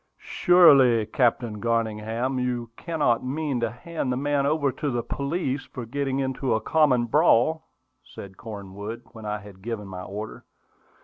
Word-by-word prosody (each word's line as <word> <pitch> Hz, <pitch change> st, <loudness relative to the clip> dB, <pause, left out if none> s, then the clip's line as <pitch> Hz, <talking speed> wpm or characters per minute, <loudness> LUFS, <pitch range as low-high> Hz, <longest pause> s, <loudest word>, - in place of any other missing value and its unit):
"Surely, 140 Hz, -, +6 dB
Captain 115 Hz, -1 st, 0 dB
Garningham, 115 Hz, +2 st, -1 dB
you 120 Hz, -2 st, -2 dB
cannot 150 Hz, -8 st, 0 dB
mean 140 Hz, 0 st, -2 dB
to 115 Hz, -1 st, 0 dB
hand 130 Hz, +4 st, -4 dB
the 125 Hz, -, -1 dB
man 140 Hz, 0 st, +1 dB
over 145 Hz, -2 st, +1 dB
to 145 Hz, -, -3 dB
the 120 Hz, -2 st, -1 dB
police 140 Hz, +1 st, -2 dB
for 125 Hz, -3 st, -8 dB
getting 135 Hz, +2 st, -2 dB
into 130 Hz, -2 st, 0 dB
a -, -, +1 dB
common 130 Hz, -1 st, +3 dB
brawl," 155 Hz, +3 st, +3 dB, 0.3 s
said 95 Hz, -7 st, -11 dB
Cornwood, 105 Hz, +2 st, -8 dB
when 110 Hz, -2 st, -9 dB
I 105 Hz, 0 st, -1 dB
had 100 Hz, -2 st, -13 dB
given 110 Hz, -1 st, -5 dB
my 95 Hz, -1 st, -7 dB
order. 105 Hz, +4 st, -7 dB
120 Hz, 150 wpm, -25 LUFS, 110-140 Hz, 0.3 s, Surely